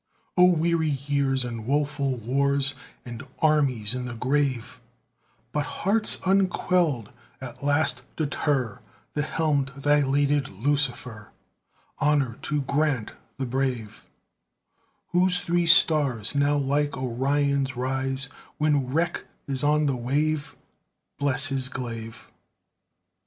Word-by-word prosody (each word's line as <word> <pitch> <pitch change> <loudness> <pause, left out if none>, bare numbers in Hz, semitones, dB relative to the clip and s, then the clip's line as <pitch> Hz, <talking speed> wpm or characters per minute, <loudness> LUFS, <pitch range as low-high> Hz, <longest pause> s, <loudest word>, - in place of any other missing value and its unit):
O 180 - +7
weary 170 -2 +2
years 140 -2 0
and 115 -2 -6
woeful 140 -1 0
wars, 140 +4 +1 0.3
And 120 -1 -7 0.2
armies 135 -9 +2
in 125 0 -4
the 120 -1 -6
grave; 130 0 -1 0.7
But 150 -1 -1 0.2
hearts 215 +2 +5
unquelled 180 - +1 0.3
at 130 0 -9
last 145 -3 +1
deter 140 -6 -1 0.3
The 150 - -1
helmed 150 -3 0
dilated 145 0 +2
Lucifer 120 -2 -2 0.7
Honor 140 -5 +1
to 150 -2 -1
Grant 140 -5 0 0.3
the 135 - -2
brave, 125 -4 -3 1.0
Whose 180 0 +2
three 170 0 0
stars 150 - +3
now 145 +1 +2
like 145 +1 0
Orion's 135 +2 0
rise 135 +1 -2 0.3
When 150 -4 +1
wreck 165 +6 -1 0.2
is 135 0 -2
on 150 +1 +3
the 140 -2 +1
wave 145 +5 -1 0.6
Bless 140 +1 +4
his 135 -2 -1
glaive. 115 -3 -7
140 Hz, 110 wpm, -25 LUFS, 130-150 Hz, 1.0 s, O